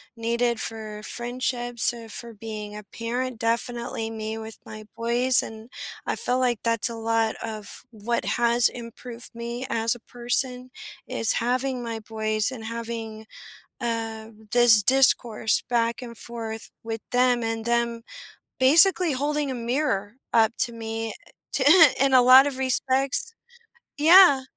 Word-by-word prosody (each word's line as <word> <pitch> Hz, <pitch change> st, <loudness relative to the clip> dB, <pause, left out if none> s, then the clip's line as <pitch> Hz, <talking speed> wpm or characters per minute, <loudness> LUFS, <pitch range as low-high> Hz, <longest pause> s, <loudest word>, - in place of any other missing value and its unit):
needed 235 Hz, 0 st, -1 dB
for 215 Hz, -1 st, -6 dB
friendships 240 Hz, 0 st, -1 dB
or 230 Hz, -1 st, -10 dB
for 235 Hz, +1 st, -7 dB
being 210 Hz, -1 st, -7 dB
a 210 Hz, -, -8 dB
parent, 235 Hz, +3 st, -5 dB
definitely 230 Hz, -1 st, -2 dB
me 220 Hz, 0 st, -5 dB
with 220 Hz, 0 st, -9 dB
my 215 Hz, 0 st, -10 dB
boys, 245 Hz, +2 st, +3 dB
and 220 Hz, +1 st, -10 dB, 0.4 s
I -, -, -2 dB
feel 250 Hz, +1 st, -1 dB
like 245 Hz, -3 st, 0 dB
that's 230 Hz, 0 st, +1 dB
a 230 Hz, -, -6 dB
lot 225 Hz, 0 st, 0 dB
of 215 Hz, -2 st, -7 dB
what 230 Hz, +1 st, -3 dB
has 235 Hz, 0 st, +2 dB
improved 235 Hz, 0 st, -10 dB
me 235 Hz, +2 st, -6 dB
as 225 Hz, 0 st, 0 dB
a 240 Hz, -, -13 dB
person 250 Hz, +2 st, -2 dB, 0.4 s
is 225 Hz, -, +3 dB
having 250 Hz, +1 st, -1 dB
my 230 Hz, -1 st, -5 dB
boys 215 Hz, 0 st, -1 dB
and 245 Hz, -4 st, -8 dB
having, 225 Hz, -1 st, -6 dB, 0.5 s
um, 225 Hz, -2 st, -5 dB
this 240 Hz, -3 st, +6 dB
discourse 240 Hz, -3 st, +3 dB
back 235 Hz, 0 st, 0 dB
and 235 Hz, -2 st, -9 dB
forth 225 Hz, -1 st, -6 dB
with 225 Hz, -1 st, -5 dB
them 245 Hz, -1 st, +2 dB
and 225 Hz, -1 st, -3 dB
them 235 Hz, 0 st, 0 dB, 0.6 s
basically 330 Hz, +5 st, +5 dB
holding 290 Hz, +1 st, -1 dB
a -, -, -3 dB
mirror 235 Hz, -4 st, -2 dB, 0.2 s
up 225 Hz, 0 st, +4 dB
to 240 Hz, -, +3 dB
me, 225 Hz, 0 st, -5 dB
uh, -, -, -14 dB, 0.2 s
t -, -, +1 dB, 0.4 s
in 275 Hz, 0 st, +3 dB
a 255 Hz, -, +7 dB
lot 260 Hz, +2 st, +8 dB
of 275 Hz, -2 st, -3 dB
respects 265 Hz, -, +1 dB, 0.7 s
Yeah 320 Hz, -3 st, +7 dB
235 Hz, 145 wpm, -24 LUFS, 225-250 Hz, 0.7 s, lot